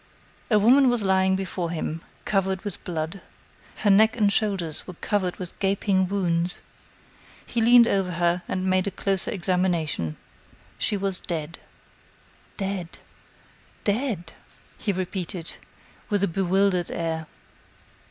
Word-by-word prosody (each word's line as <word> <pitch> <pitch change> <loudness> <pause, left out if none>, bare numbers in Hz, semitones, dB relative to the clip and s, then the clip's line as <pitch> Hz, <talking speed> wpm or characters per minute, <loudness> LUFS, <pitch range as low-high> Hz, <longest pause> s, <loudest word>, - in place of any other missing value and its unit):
A 215 - +5
woman 255 +6 +6
was 245 -3 +1
lying 190 0 +3
before 185 -2 -3
him, 165 -1 -3 0.2
covered 190 -1 0
with 205 -4 -5
blood. 165 +2 -4 0.5
Her 205 - +2
neck 220 +4 +5
and 205 -3 +3
shoulders 190 -8 -1
were 180 - -8
covered 185 -1 -1
with 180 -2 -8
gaping 195 -1 +2
wounds. 180 -3 0 0.9
He 235 - -1
leaned 235 +1 +7
over 190 -4 +1
her 175 +1 +1
and 185 0 -2
made 185 0 +2
a - - +2
closer 195 -1 0
examination. 175 - 0 0.6
She 205 - +1
was 195 -1 0
dead. 165 -2 -5 1.0
"Dead! 190 -4 -4 0.9
Dead!" 205 -6 -1 0.5
he 210 - 0
repeated, 180 -2 -4 0.5
with 205 -3 +1
a - - +4
bewildered 190 0 +1
air. 160 -1 -3
190 Hz, 125 wpm, -25 LUFS, 175-200 Hz, 1.0 s, leaned